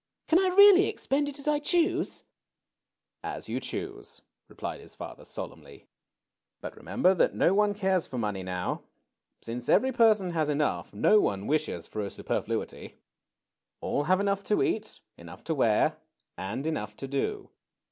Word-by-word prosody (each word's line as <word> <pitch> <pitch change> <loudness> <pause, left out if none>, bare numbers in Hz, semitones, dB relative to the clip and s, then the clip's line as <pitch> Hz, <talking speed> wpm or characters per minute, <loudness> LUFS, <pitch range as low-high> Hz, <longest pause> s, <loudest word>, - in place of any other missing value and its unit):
Can 330 - +5
I 380 - +3
really 400 -1 +8
expend 285 +2 -1
it 285 - -8
as 280 - -7
I 300 -1 +3
choose?" 335 +2 0 1.0
^^As - - -5
yon - - -3
choose/' - - -6 0.3
replied - - -6
his - - -10
father, - - -9
solemnly. - - -8 0.8
^^But - - -6
remember 185 - +2
that 185 - +2
no 180 - +3
one 205 0 +2
cares 190 -3 +1
for 130 - -6
money 105 -4 -2
now. 90 -1 -3 0.6
Since 120 +1 -5
every 265 +1 +4
person 215 -6 +4
has 155 -3 0
enough, 150 0 -1
no 215 - +4
one 100 - 0
wishes 145 - -1
for 105 - -5
a 100 - -3
super - - -2
fluity. - - -5 0.8
All 145 - -1
have 185 +3 +3
enough 200 0 0
to 210 - +2
eat, 220 0 -2 0.2
enough 85 +1 -12
to 165 - -1
wear, 115 -7 +2 0.4
and 105 +9 -4
enough 105 -10 -3
to 135 - -6
do. 135 0 -3
170 Hz, 160 wpm, -28 LUFS, -, 1.0 s, really